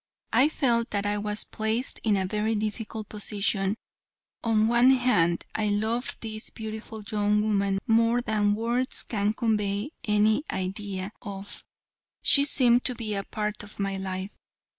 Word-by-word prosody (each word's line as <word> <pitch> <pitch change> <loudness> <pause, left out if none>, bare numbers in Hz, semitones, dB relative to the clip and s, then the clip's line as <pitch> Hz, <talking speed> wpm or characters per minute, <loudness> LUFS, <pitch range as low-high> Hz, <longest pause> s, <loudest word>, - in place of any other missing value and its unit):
I 275 +4 +5
felt 235 -6 +1
that 205 -1 -1
I 205 0 0
was 210 0 +1
placed 220 +4 -2
in 210 -3 +3
a 190 - 0
very 210 +3 0
difficult 215 0 -4
position. 205 -1 -1 0.7
On 225 -2 +2
the - - +4
one 240 +3 +5
hand, 175 -10 +2
I 215 -1 0
loved 220 +4 -1
this 220 -1 -5
beautiful 220 -1 -7
young 210 0 +2
woman 200 -2 +1
more 230 +1 +3
than 210 -3 +1
words 235 +4 -1
can 210 -1 0
convey 210 +2 0
any 215 +5 +3
idea 190 +1 -3
of. 200 -2 -8 0.6
She 280 0 +5
seemed 245 -3 +4
to 250 - +1
be 220 -2 -3
a 200 - 0
part 210 -1 -3
of 210 0 -11
my 195 -1 -1
life. 190 +1 -4
215 Hz, 155 wpm, -27 LUFS, 205-230 Hz, 0.7 s, I